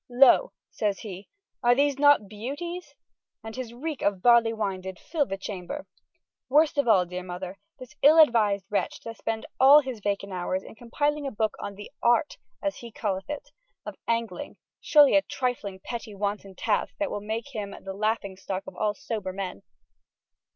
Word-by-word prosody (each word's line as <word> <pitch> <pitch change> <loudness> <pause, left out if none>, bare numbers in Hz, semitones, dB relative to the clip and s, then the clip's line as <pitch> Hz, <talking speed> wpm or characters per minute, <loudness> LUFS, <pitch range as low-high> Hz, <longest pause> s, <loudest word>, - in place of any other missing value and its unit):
Lo, 270 - +6 0.2
says 205 -3 -1
he, 195 -2 -8 0.3
are 240 -1 +5
these 280 0 +2
not 285 -7 +5
beuties? 285 - -6 0.5
And 220 0 -7
his 255 -3 -5
reek 285 +4 -5
of 195 -2 0
barley 235 -2 +6
wine 200 -4 -2
did 190 -1 -7
fille 295 - -1
the 195 - -3
chamber. 195 +8 -6 0.6
Worste 295 +1 +4
of 280 - +2
alle, 195 -5 +5
deare 180 +1 -5
Mother, 180 +1 -7 0.2
this 255 +1 -11
all 300 +3 +8
advised 215 - +5
wretche 205 - -1
doth 230 -1 -8
spend 225 0 -3
alle 280 +3 +9
his 260 -5 -6
vacant 200 -1 -2
houres 185 +1 -2
in - - -11
compiling 290 +6 -1
a - - -3
booke 215 -1 0
on 200 - -6
the 205 +1 -10
art 240 +5 +2 0.3
(as 295 -1 -1
he 235 -1 -9
calleth 195 -2 -3
it) 295 -1 -6 0.3
of - - -6
angling, 230 +5 -2 0.2
surely 295 -2 +6
a 295 - +6
trifling 240 -9 -3
petty 230 0 -6
wanton 200 -1 -3
taske 210 +2 -1
that 300 0 -1
will 205 - -3
make 220 +5 -4
hym 205 -5 -5
the 195 - -5
laughing 210 -1 -1
stocke 195 +1 -5
of - - -9
all 210 -1 0
sober 205 -3 -4
men. 185 - -5
220 Hz, 180 wpm, -27 LUFS, 200-270 Hz, 0.6 s, alle